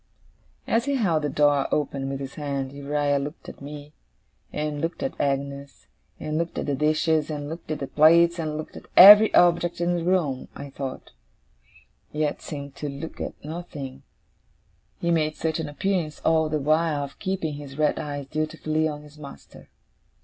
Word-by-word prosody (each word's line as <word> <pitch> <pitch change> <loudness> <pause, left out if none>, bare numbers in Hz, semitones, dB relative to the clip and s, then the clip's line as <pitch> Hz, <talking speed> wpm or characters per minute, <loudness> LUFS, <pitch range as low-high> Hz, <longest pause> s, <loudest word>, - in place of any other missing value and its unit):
As 230 +2 +1
he 280 0 0
held 175 -11 +1
the 150 - -1
door 145 0 +3
open 140 -2 -1
with 135 0 -4
his 135 -1 -6
hand, 140 -3 -3
Uriah 145 0 0
looked 145 +4 -7
at - - -10
me, 145 +1 -9 0.6
and 150 -1 -3
looked 165 +8 -3
at 270 - -2
Agnes, 140 0 -3 0.3
and 155 +1 -2
looked 170 0 -3
at - - -2
the 145 - -1
dishes, 155 +2 +1
and 145 -2 -4
looked 165 +2 -8
at 155 - -1
the 140 - -4
plates, 170 +4 +5
and 155 -2 -2
looked 155 - -7
at - - -11
every 210 +3 +11
object 175 -1 +3
in 175 0 +1
the 170 - -2
room, 165 -8 0
I 140 0 -8
thought, 135 -1 -6 1.0
yet 150 -1 -1
seemed 140 -2 -7
to 150 - -4
look 140 +4 -7
at - - -4
nothing; 150 -5 -7 1.0
he 170 - 0
made 155 -2 +1
such 160 0 -2
an 155 -2 -3
appearance 160 +1 -2
all 160 -1 +2
the 155 - 0
while 155 0 +1
of 140 - -9
keeping 190 -5 -2
his 145 -1 -9
red 150 -1 +1
eyes 145 -1 -5
dutifully 155 +2 -1
on 150 -1 -6
his 150 0 -16
master. 140 - -12
150 Hz, 180 wpm, -25 LUFS, 140-165 Hz, 1.0 s, every